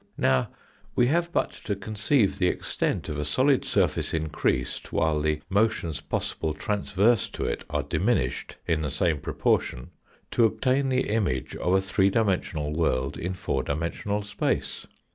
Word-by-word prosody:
Now 65 -1 +2 0.5
we 120 - +4
have 170 0 +1
but - - +1
to 100 - 0
conceive 105 +2 +1
the 90 - +3
extent - - -1
of 75 - -3
a - - 0
solid 130 - +3
surface - - +1
increased, 75 -5 -1
while 80 -1 +1
the 75 0 0
motions 100 -6 +1
possible 80 -2 -2
tranverse 105 +3 +1
to - - -3
it - - -2
are - - -1
diminished - - 0
in 80 -2 +1
the 75 - -1
same 80 +2 +1
proportion, 60 -2 0 0.4
to 115 - +4
obtain 130 +5 +1
the 130 0 +1
image 100 -12 -1
of 90 - 0
a 95 - +4
three 95 0 +2
dimensional 90 -8 0
world 70 -4 0
in 90 +2 -3
four 70 -6 -1
dimensional 85 +9 -2
space. 105 0 -2
95 Hz, 155 wpm, -26 LUFS, 75-110 Hz, 0.5 s, we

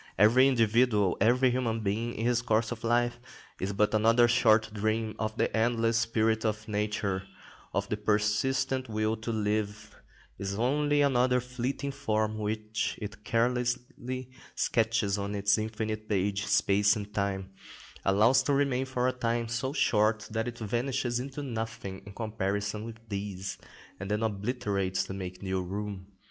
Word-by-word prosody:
Every 120 +6 +6
individual, 115 -5 +3
every 125 +4 +4
human 115 -3 -1
being 110 +4 -2
and 115 - -2
his 120 0 +2
course 110 -1 +1
of 120 -1 -6
life, 120 +1 +1 0.4
is 95 +2 -2
but 105 +2 +1
another 115 +2 +5
short 110 -3 +4
dream 110 +1 -1
of 110 0 -2
the - - 0
endless 115 0 +2
spirit 110 -1 +1
of 110 -1 -2
nature, 105 -2 -1 0.5
of 100 +1 -1
the 105 - -2
persistent 130 +5 +1
will 110 0 0
to 110 +2 -4
live; 105 -1 -2 0.4
is 100 0 -3
only 145 +4 +2
another 125 -2 +3
fleeting 125 +3 -3
form, 110 -5 -1
which 110 +1 -2
it 105 0 -7
carelessly 125 +2 -1 0.2
sketches 110 -3 +1
on 100 +1 -3
its 100 +1 +2
infinite 110 0 -3
page, 100 0 0
space 105 +1 +3
and 105 -1 -6
time; 95 -2 -2 0.5
allows 110 +7 +4
to 145 - 0
remain 135 -2 +1
for 125 -1 0
a - - +3
time 120 -1 -1
so 120 +3 -2
short 110 -6 +2
that 115 +1 -1
it 120 -1 -5
vanishes 120 +2 -1
into 135 +3 -5
nothing 115 -6 -5
in 100 - -9
comparison 105 -1 -2
with 115 -1 -8
these, 100 -2 -4 0.4
and 100 +1 -5
then 105 +2 0
obliterates 100 -3 -1
to - - -6
make 95 -1 -6
new 95 -1 -1
room. 100 +1 -5
110 Hz, 155 wpm, -29 LUFS, 105-120 Hz, 0.5 s, Every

